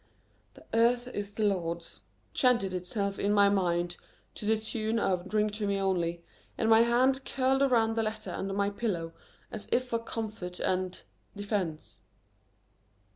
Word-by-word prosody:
"The -, -, -16 dB
earth 240 Hz, +2 st, +3 dB
is 205 Hz, -3 st, -5 dB
the 220 Hz, -, -1 dB
Lord's 170 Hz, -, -2 dB, 0.2 s
" 100 Hz, -1 st, -39 dB
chanted 235 Hz, -7 st, +2 dB
itself 195 Hz, +2 st, -2 dB
in 200 Hz, -, +1 dB
my 200 Hz, -1 st, +6 dB
mind 175 Hz, -3 st, 0 dB, 0.4 s
to -, -, -7 dB
the 220 Hz, 0 st, +4 dB
tune 220 Hz, +1 st, -2 dB
of 185 Hz, -4 st, 0 dB
"Drink 215 Hz, 0 st, +1 dB
to 210 Hz, -1 st, -2 dB
me 200 Hz, 0 st, +1 dB
only," 170 Hz, -3 st, 0 dB, 0.3 s
and 225 Hz, -, +1 dB
my 225 Hz, 0 st, +8 dB
hand 255 Hz, +3 st, +3 dB
curled 265 Hz, 0 st, +1 dB
around 235 Hz, -5 st, +3 dB
the 225 Hz, -, +2 dB
letter 215 Hz, -3 st, -3 dB
under 195 Hz, +2 st, -3 dB
my 200 Hz, 0 st, +1 dB
pillow 180 Hz, -7 st, -2 dB, 0.4 s
as 215 Hz, -2 st, -6 dB
if 255 Hz, -, +2 dB
for 235 Hz, -2 st, -1 dB
comfort 215 Hz, -6 st, -5 dB
and 185 Hz, 0 st, -1 dB, 0.4 s
defense. 200 Hz, -6 st, -3 dB
205 Hz, 160 wpm, -30 LUFS, 185-225 Hz, 0.4 s, my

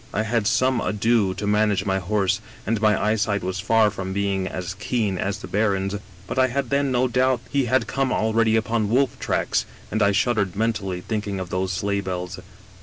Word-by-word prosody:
I 110 Hz, -, +1 dB
had 110 Hz, -1 st, 0 dB
some 130 Hz, 0 st, +2 dB
ado 105 Hz, -2 st, +1 dB
to 105 Hz, -, -4 dB
manage 105 Hz, -1 st, +2 dB
my 95 Hz, -1 st, +1 dB
horse, 95 Hz, 0 st, 0 dB, 0.2 s
and 110 Hz, +1 st, 0 dB
my 105 Hz, -2 st, +3 dB
eyesight 105 Hz, -1 st, 0 dB
was 95 Hz, +1 st, -3 dB
far 110 Hz, +1 st, +3 dB
from 95 Hz, -2 st, -5 dB
being 100 Hz, -1 st, 0 dB
as 90 Hz, -1 st, -4 dB
keen 100 Hz, -2 st, -1 dB
as 100 Hz, +1 st, -1 dB
the -, -, -9 dB
baron's, 100 Hz, -1 st, 0 dB, 0.3 s
but 130 Hz, -, -3 dB
I 130 Hz, -, +5 dB
had 130 Hz, -1 st, -2 dB
then 140 Hz, -1 st, +2 dB
no 125 Hz, +1 st, +2 dB
doubt 125 Hz, 0 st, +2 dB
he 140 Hz, -2 st, +2 dB
had 130 Hz, +2 st, +2 dB
come 135 Hz, -1 st, -1 dB
already 110 Hz, 0 st, +2 dB
upon 110 Hz, -1 st, 0 dB
wolf 130 Hz, +3 st, +1 dB
tracks, -, -, 0 dB, 0.3 s
and 110 Hz, -, 0 dB
I 100 Hz, -1 st, +4 dB
shuddered 100 Hz, -2 st, +1 dB
mentally, 100 Hz, -4 st, -1 dB
thinking 105 Hz, -2 st, -3 dB
of 90 Hz, -1 st, -6 dB
the 95 Hz, +1 st, 0 dB
sleigh 100 Hz, +2 st, -1 dB
bells. 90 Hz, -2 st, -4 dB
105 Hz, 195 wpm, -23 LUFS, 95-115 Hz, 0.3 s, I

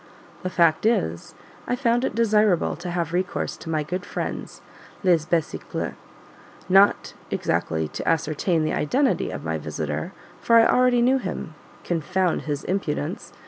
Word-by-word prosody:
The 185 Hz, -, -2 dB
fact 170 Hz, +2 st, +3 dB
is, 85 Hz, -, -1 dB, 0.3 s
I -, -, +1 dB
found 240 Hz, -1 st, +1 dB
it 210 Hz, -, -1 dB
desirable 210 Hz, -5 st, +3 dB
to 175 Hz, +3 st, -6 dB
have 170 Hz, -2 st, -2 dB
recourse 180 Hz, +1 st, -1 dB
to 160 Hz, -, -9 dB
my 155 Hz, -2 st, 0 dB
good 180 Hz, +4 st, -4 dB
friends -, -, -5 dB, 0.4 s
"les 170 Hz, -4 st, +3 dB
besicles;" 165 Hz, -3 st, -2 dB, 0.7 s
not 195 Hz, +2 st, +4 dB, 0.2 s
exactly 80 Hz, -1 st, -1 dB
to -, -, -3 dB
ascertain 160 Hz, +1 st, +1 dB
the 155 Hz, -, 0 dB
identity 265 Hz, -, +1 dB
of -, -, -6 dB
my -, -, -1 dB
visitor -, -, -4 dB, 0.3 s
for 230 Hz, -, +3 dB
I 230 Hz, 0 st, +8 dB
already 250 Hz, -1 st, +4 dB
knew 260 Hz, +2 st, +4 dB
him, 155 Hz, -, -5 dB, 0.3 s
confound 180 Hz, +2 st, 0 dB
his 145 Hz, -1 st, -2 dB
impudence! 170 Hz, -3 st, -3 dB
180 Hz, 145 wpm, -24 LUFS, 160-220 Hz, 0.7 s, I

